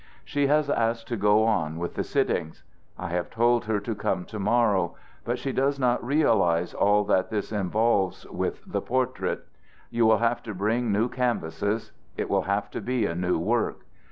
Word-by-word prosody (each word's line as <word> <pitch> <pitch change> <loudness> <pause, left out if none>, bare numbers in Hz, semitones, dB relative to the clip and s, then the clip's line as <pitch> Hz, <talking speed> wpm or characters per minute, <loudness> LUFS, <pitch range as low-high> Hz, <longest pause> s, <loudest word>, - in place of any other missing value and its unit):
"She 145 -1 +1
has 150 +1 +3
asked 115 -3 0
to 120 - -1
go 105 +1 +4
on 80 -8 0
with 85 0 -4
the - - -2
sittings. 80 -3 -1 0.3
I - - -5
have 90 0 -2
told 120 0 +2
her 110 -1 0
to 115 +3 -3
come 90 -3 -2
to 110 - -7
morrow. 100 -4 +2 0.3
But 120 +1 -1
she 135 - -3
does 140 +2 +1
not 125 -2 +1
realize 100 - +2
all 105 +1 +3
that 95 -2 +1
this 105 -1 -3
involves 105 -1 +1
with - - -3
the - - -2
portrait. 130 0 -1 0.5
You 115 -1 +3
will 110 0 +5
have 115 +1 +1
to 110 -4 -7
bring 110 +4 0
new 105 +4 +2
canvases, 110 -4 -2 0.3
it - - -2
will - - +3
have 100 +1 -2
to - - -4
be 125 -3 0
a 85 - -1
new 90 +1 0
work. 110 +7 0
110 Hz, 185 wpm, -26 LUFS, 95-120 Hz, 0.5 s, will